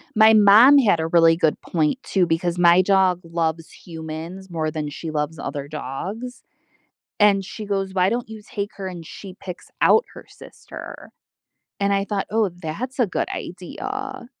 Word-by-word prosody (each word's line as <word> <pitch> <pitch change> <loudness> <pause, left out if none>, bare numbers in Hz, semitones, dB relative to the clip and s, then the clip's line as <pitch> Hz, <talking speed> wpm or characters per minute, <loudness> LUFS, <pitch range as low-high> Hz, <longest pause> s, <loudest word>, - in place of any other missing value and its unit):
My 220 +1 +7
mom 215 +7 +8
had 210 -11 +4
a 160 - -1
really 165 -1 +4
good 160 -3 +1
point 160 +8 0
too 190 -2 +1
because 170 +1 -1
my 175 +1 +6
dog 185 -2 +2
loves 165 -1 -2
humans 165 +3 -8
more 160 -2 -2
than 155 -1 -4
she 160 +3 -7
loves 150 0 -3
other 140 0 -5
dogs, 195 - -6 0.8
and 205 -2 +4
she 210 +3 -8
goes, 195 -1 -2
"Why 185 0 +3
don't 235 +1 -3
you 220 -1 -9
take 205 0 -4
her, 195 - -5
and 175 -3 -8
she 190 +3 -10
picks 180 -2 -8
out 455 - +5
her - - -12
sister," - - -11 0.7
and 200 0 +1
I 195 0 +1
thought, 200 -1 -3
"Oh, 220 -1 +2
that's 220 - -5
a 245 - +3
good 185 - -2
idea." 260 - -6
185 Hz, 170 wpm, -22 LUFS, 165-210 Hz, 0.8 s, mom